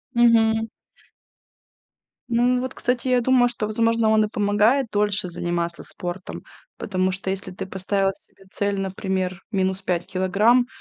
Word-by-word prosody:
Мгм. 225 Hz, -1 st, +4 dB, 1.6 s
Ну 245 Hz, +1 st, +2 dB
вот, 260 Hz, 0 st, -4 dB
кстати, 250 Hz, +1 st, -1 dB
я 250 Hz, -1 st, +3 dB
думаю, 245 Hz, 0 st, +4 dB
что, 240 Hz, -3 st, -3 dB
возможно, 230 Hz, +1 st, +1 dB
он 215 Hz, 0 st, +4 dB
и -, -, 0 dB
помогает 210 Hz, +5 st, +2 dB
дольше 205 Hz, -2 st, +1 dB
заниматься 170 Hz, 0 st, -3 dB
спортом, 180 Hz, +1 st, -7 dB, 0.3 s
потому 185 Hz, -2 st, -1 dB
что 190 Hz, 0 st, -4 dB
если 190 Hz, -1 st, -4 dB
ты 185 Hz, -, -6 dB
поставил 195 Hz, +1 st, -1 dB
себе 195 Hz, -, -17 dB
цель, 200 Hz, -1 st, -1 dB
например, 190 Hz, -1 st, -3 dB
минус 190 Hz, -1 st, 0 dB
5 180 Hz, -2 st, -1 dB
килограмм, 210 Hz, +7 st, +2 dB
205 Hz, 140 wpm, -23 LUFS, 190-230 Hz, 1.6 s, Мгм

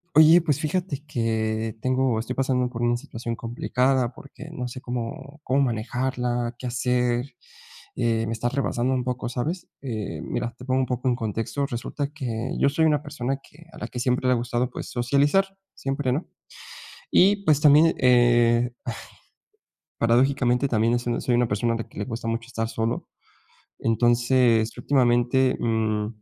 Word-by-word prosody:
Oye, 160 Hz, +3 st, +8 dB
pues, 150 Hz, -4 st, 0 dB
fíjate 155 Hz, -2 st, -2 dB
que, 110 Hz, -4 st, -1 dB
tengo 130 Hz, -3 st, +1 dB
estoy 125 Hz, +3 st, -4 dB
pasando 130 Hz, -2 st, +1 dB
por 120 Hz, -1 st, -5 dB
una 120 Hz, 0 st, +2 dB
situación 115 Hz, -3 st, -6 dB
complicada 125 Hz, +2 st, 0 dB
porque 140 Hz, +3 st, -12 dB
no 125 Hz, -6 st, -4 dB
sé 125 Hz, +1 st, -7 dB
cómo 125 Hz, +4 st, -6 dB
cómo 135 Hz, -1 st, +1 dB
manejarla, 120 Hz, 0 st, -1 dB
qué 130 Hz, -, -5 dB
hacer, 125 Hz, 0 st, 0 dB, 0.7 s
eh, 115 Hz, -1 st, 0 dB
me 115 Hz, -, -2 dB
está 115 Hz, +1 st, -1 dB
rebasando 130 Hz, -1 st, 0 dB
un 125 Hz, -1 st, -1 dB
poco, 125 Hz, -1 st, -3 dB
¿sabes?, 155 Hz, +9 st, -3 dB
eh, 110 Hz, -, -4 dB
mira, 120 Hz, +7 st, -3 dB
te 125 Hz, -, -11 dB
pongo 130 Hz, 0 st, +1 dB
un -, -, +1 dB
poco 125 Hz, 0 st, -3 dB
en 125 Hz, -, +3 dB
contexto. 115 Hz, +4 st, -2 dB
Resulta 140 Hz, +2 st, -4 dB
que, 120 Hz, -5 st, -4 dB
yo -, -, +4 dB
soy 145 Hz, +3 st, +1 dB
una 150 Hz, -3 st, +3 dB
persona 135 Hz, -3 st, -3 dB
que 160 Hz, +4 st, -18 dB
a -, -, -13 dB
la -, -, -5 dB
que 125 Hz, -, -6 dB
siempre 125 Hz, +1 st, +1 dB
le 125 Hz, -, +5 dB
ha -, -, +2 dB
gustado, 120 Hz, +1 st, -1 dB
pues, -, -, -7 dB
socializar. 145 Hz, +11 st, +1 dB, 0.2 s
Siempre, 135 Hz, -1 st, -2 dB
¿no? 145 Hz, +7 st, -1 dB, 0.9 s
Y, 200 Hz, +2 st, +4 dB
pues, 150 Hz, -2 st, +4 dB
también, 150 Hz, +2 st, +6 dB
eh, 120 Hz, -1 st, +4 dB
ay, -, -, -3 dB, 1.0 s
paradójicamente, 125 Hz, +2 st, +2 dB
también, 115 Hz, -1 st, +2 dB
eh, -, -, +2 dB
soy 120 Hz, 0 st, -2 dB
soy 125 Hz, -, +1 dB
una 120 Hz, -1 st, +2 dB
persona 110 Hz, +3 st, 0 dB
a -, -, 0 dB
la 115 Hz, -, -6 dB
que -, -, -21 dB
le 105 Hz, -, -1 dB
gusta 115 Hz, -1 st, -5 dB
mucho 115 Hz, 0 st, -2 dB
estar 115 Hz, -2 st, -3 dB
solo. 115 Hz, 0 st, -2 dB, 0.7 s
Entonces, 120 Hz, 0 st, +2 dB
últimamente, 125 Hz, -1 st, +2 dB
mm, 110 Hz, -2 st, 0 dB
125 Hz, 170 wpm, -24 LUFS, 115-135 Hz, 1.0 s, Oye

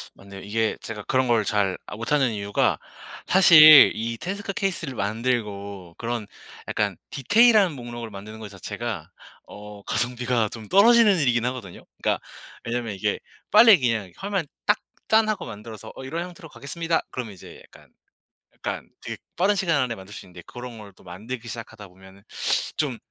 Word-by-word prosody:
맞네요. 100 Hz, 0 st, -12 dB
이게 110 Hz, +2 st, -1 dB
제가 105 Hz, -2 st, -7 dB
그런 130 Hz, +3 st, +1 dB
걸 115 Hz, -3 st, +3 dB
잘 100 Hz, -3 st, +1 dB
아 -, -, -8 dB
못하는 130 Hz, +2 st, +1 dB
이유가 100 Hz, -1 st, 0 dB, 0.5 s
사실 155 Hz, -5 st, +9 dB
이 115 Hz, +1 st, -3 dB
테스크 195 Hz, -, -4 dB
케이스를 170 Hz, -9 st, -3 dB
만들고 100 Hz, -5 st, -3 dB
그런 115 Hz, -2 st, -4 dB, 0.4 s
약간 -, -, -1 dB
디테일한 210 Hz, -, +4 dB
목록을 120 Hz, -3 st, -7 dB
만드는 105 Hz, +2 st, -10 dB
것 110 Hz, -2 st, -8 dB
자체가 95 Hz, -2 st, -6 dB, 0.4 s
어 105 Hz, 0 st, -11 dB
가성비가 120 Hz, -2 st, 0 dB
좀 110 Hz, -2 st, -10 dB
떨어지는 215 Hz, -, +6 dB
일이긴 120 Hz, -4 st, +1 dB
하거든요. 125 Hz, -8 st, -6 dB, 0.2 s
그러니까 -, -, 0 dB, 0.4 s
왜냐하면 115 Hz, -2 st, -3 dB
이게 95 Hz, -, -1 dB, 0.3 s
빨리 215 Hz, -1 st, +8 dB
그냥 110 Hz, -7 st, -1 dB
화면 195 Hz, -4 st, -2 dB, 0.2 s
딱 205 Hz, 0 st, +3 dB, 0.3 s
짠하고 215 Hz, -1 st, +2 dB
만들어서 105 Hz, +1 st, -9 dB
어 -, -, -9 dB
"이런 165 Hz, +6 st, -4 dB
형태로 175 Hz, -3 st, -12 dB
가겠습니다." 165 Hz, +3 st, -2 dB
그러면 115 Hz, -5 st, -5 dB
이제 90 Hz, -, -13 dB
약간, -, -, -19 dB, 0.7 s
약간 -, -, -5 dB
되게 -, -, -6 dB, 0.2 s
빠른 200 Hz, +3 st, +2 dB
시간 165 Hz, -6 st, +1 dB
안에 120 Hz, -2 st, -2 dB
만들 95 Hz, +2 st, -12 dB
수 -, -, -9 dB
있는데 90 Hz, -1 st, -13 dB
그런 120 Hz, -2 st, -9 dB
걸 105 Hz, -2 st, -12 dB
또 -, -, -21 dB
만들기 110 Hz, +7 st, -8 dB
시작하다 110 Hz, -3 st, -9 dB
보면은 95 Hz, +2 st, -17 dB, 0.6 s
좀 135 Hz, -6 st, -1 dB
120 Hz, 360 characters per minute, -24 LUFS, 105-160 Hz, 0.7 s, 사실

